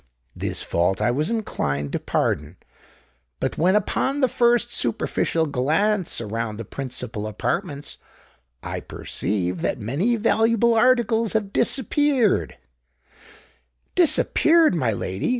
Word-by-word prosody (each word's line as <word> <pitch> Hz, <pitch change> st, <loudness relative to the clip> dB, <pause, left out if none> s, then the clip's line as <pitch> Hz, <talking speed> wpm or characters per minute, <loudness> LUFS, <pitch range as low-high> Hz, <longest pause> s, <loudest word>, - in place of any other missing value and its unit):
This -, -, -3 dB
fault 90 Hz, +3 st, 0 dB
I 110 Hz, +3 st, +2 dB
was 150 Hz, +5 st, 0 dB
inclined 75 Hz, -, -2 dB
to -, -, -2 dB
pardon: 75 Hz, +4 st, -1 dB, 0.8 s
but -, -, -2 dB
when, 180 Hz, +5 st, +3 dB
upon 265 Hz, +7 st, 0 dB
the 260 Hz, -, +4 dB
first 240 Hz, 0 st, +2 dB
superficial 160 Hz, -1 st, 0 dB
glance 160 Hz, +8 st, 0 dB
around 115 Hz, -1 st, -4 dB
the 115 Hz, -, -6 dB
principal 125 Hz, -4 st, -5 dB
apartments, 125 Hz, +6 st, -3 dB, 0.6 s
I -, -, -4 dB
perceive 90 Hz, -3 st, -3 dB
that -, -, -1 dB
many 145 Hz, -, 0 dB
valuable 230 Hz, +1 st, +2 dB
articles 230 Hz, -2 st, +2 dB
have 210 Hz, -3 st, -1 dB
disappeared——" 265 Hz, -, +2 dB, 1.4 s
"Disappeared, 330 Hz, -, +4 dB
my 130 Hz, -9 st, +1 dB
lady!" 95 Hz, -2 st, -3 dB
160 Hz, 115 wpm, -23 LUFS, -, 1.4 s, the